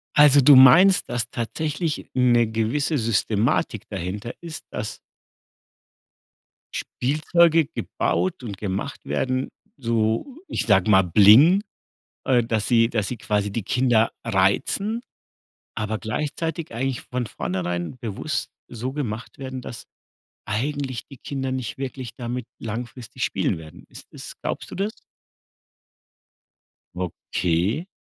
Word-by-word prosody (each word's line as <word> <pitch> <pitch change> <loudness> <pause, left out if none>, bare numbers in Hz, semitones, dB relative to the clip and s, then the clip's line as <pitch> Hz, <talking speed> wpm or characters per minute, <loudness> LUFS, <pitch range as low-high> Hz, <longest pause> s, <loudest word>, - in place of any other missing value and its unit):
Also 145 -1 +7
du 140 +2 +8
meinst, 150 +10 +7
dass 120 -1 -1
tatsächlich 155 +7 -3
'ne 120 -2 +4
gewisse 120 +8 0
Systematik 115 +1 0
dahinter 100 +4 -5
ist, 165 -2 -8
dass 105 0 -5 1.8
Spielzeuge 160 +4 +2
gebaut 95 -5 -2
und 105 -5 -6
gemacht 100 +7 -4
werden, 130 0 -1 0.3
so, 115 - -1
ich - - -2
sage 95 -3 +3
mal, 95 -2 +6
Bling 110 - +7 0.6
äh, 125 -2 +4
dass 110 -2 -1
sie 115 -1 +4
dass 110 -4 -1
sie 125 - -4
quasi 105 -2 -1
die 110 +1 -3
Kinder 120 0 +2
reizen, 120 - +1 0.7
aber 110 0 -2
gleichzeitig 150 +5 -3
eigentlich 130 +1 -2
von 125 -2 -4
vornherein 90 +2 -3
bewusst 115 +7 -3 0.2
so 125 +2 -5
gemacht 120 -6 -5
werden, 130 -1 -6
dass 120 - -8 0.6
eigentlich 130 +3 -3
die 135 - -12
Kinder 135 0 -4
nicht 130 -3 -4
wirklich 130 -3 -5
damit 125 0 -4
langfristig 120 +1 -5
spielen - - 0
werden. 80 -1 -12
Ist - - -12
es - - -8
glaubst - - -4
du - - -7
das? 200 +3 -2 2.0
Okay. 90 - -1
120 Hz, 120 wpm, -23 LUFS, 105-140 Hz, 2.0 s, du